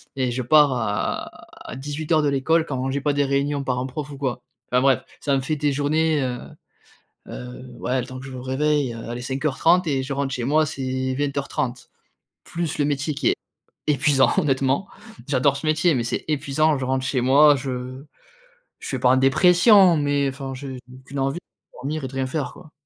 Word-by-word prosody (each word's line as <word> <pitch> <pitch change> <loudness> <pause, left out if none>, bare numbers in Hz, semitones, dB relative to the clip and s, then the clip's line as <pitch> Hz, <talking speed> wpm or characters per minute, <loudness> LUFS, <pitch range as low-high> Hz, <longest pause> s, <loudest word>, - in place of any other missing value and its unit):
et 130 -2 0
je 125 +2 -2
pars 145 +2 +5
à 110 -4 -2 0.4
à - - -6
18:00 150 +3 -1
de - - +2
l'école 160 +4 +2
quand 130 -3 -3
j'ai 140 +1 -1
pas 145 +1 0
des 145 0 +2
réunions 140 +1 0
parents 125 -1 -1
prof 140 +3 -6
ou 140 - -8
quoi. 130 -3 -3 0.3
Enfin 125 0 +3
bref, 135 -3 +3 0.2
ça 140 -2 0
me 135 - 0
fait 155 +4 -1
des 145 0 +1
journées, 150 +2 +1
heu 125 -1 -3 0.9
heu, 125 +1 -8 0.2
ouais, 130 +2 0
le - - -8
temps 130 -1 -8
que 135 - -9
je - - -8
me 130 - -7
réveille, 135 +1 0
heu, 115 - -8
allez 120 +1 -5
05:30 150 +7 +1
et 135 -3 0
je 135 +2 -4
rentre 135 0 -2
chez 125 -2 -3
moi, 155 +4 +3
c'est 130 -1 -3
20:30. 140 -3 -2 0.6
Plus 170 -3 -4
le 145 - +2
métier 145 +1 -1
qui 140 -3 0
est - - +3 0.5
épuisant 140 -3 +3
honnêtement, 135 +4 +1 0.4
j'adore 140 0 +2
ce 140 - -5
métier, 155 +2 +3
mais 120 -3 0
c'est 120 - -3
épuisant, 150 0 +1
je 130 - -3
rentre 130 0 -1
chez 130 -1 0
moi, 140 +4 +6
je 130 0 -5 0.7
je - - -10
suis 130 - -2
pas 125 - +3
en 130 - +5
dépression, 180 - +6
mais, 145 -1 +1
enfin 135 0 -5
j'ai 130 0 -7 0.3
qu'une 140 +2 -6
envie 135 +4 -1 0.4
dormir 145 +3 -4
et - - -1
rien 135 0 -2
faire 135 -1 -3
quoi. 155 -4 -15
135 Hz, 200 wpm, -23 LUFS, 130-150 Hz, 0.9 s, moi